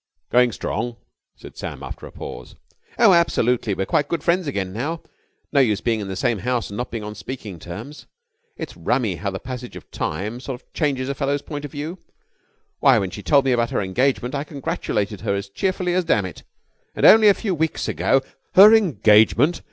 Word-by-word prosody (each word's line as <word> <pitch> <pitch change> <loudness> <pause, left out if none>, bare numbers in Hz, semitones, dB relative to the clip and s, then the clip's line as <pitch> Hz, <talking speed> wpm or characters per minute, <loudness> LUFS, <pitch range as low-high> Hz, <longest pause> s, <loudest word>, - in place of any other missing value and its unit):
"Going 125 0 +4
strong?" 115 +2 -4 0.4
said - - -13
Sam, - - -6
after - - -8
a - - -13
pause. 60 - -9 0.4
"Oh, 225 -5 +6
absolutely. 125 - +2
We're 95 - -2
quite 145 - +1
good 165 -1 -3
friends 175 -1 +1
again 95 -8 -3
now. 150 +10 -3 0.5
No 145 - +3
use 110 -7 +3
being 115 -1 0
in 100 - -5
the 95 - -4
same 120 0 0
house 120 0 -2
and 100 - -6
not 125 - -3
being 115 -2 -5
on 105 0 -6
speaking 105 -7 -8
terms. 105 - -9 0.5
It's - - -7
rummy 110 -9 0
how 100 +4 -3
the 95 - -4
passage 125 +2 -8
of - - -12
time 105 +10 -3
sort 130 -1 -6
of - - -37
changes 135 -5 -1
a 140 - -1
fellow's 140 +1 -1
point 145 -2 -6
of 145 - -8
view. 155 +5 -6 0.8
Why, 135 -3 +5
when 95 -4 -1
she 105 - -7
told 140 +4 +3
me 135 - +2
about 120 -1 +1
her - - -1
engagement, 125 +5 0
I 140 0 -2
congratulated 140 - -3
her 100 - -1
as 100 0 -5
cheerfully 185 - -1
as 185 0 +2
dammit! 100 - -1 0.5
And - - +1
only 220 -1 +8
a 200 - +6
few 200 -5 -2
weeks 160 -2 -1
ago...." 110 - +1 0.3
"Her 205 +4 +10
engagement!" 145 - +4
125 Hz, 200 wpm, -22 LUFS, 105-150 Hz, 0.8 s, Her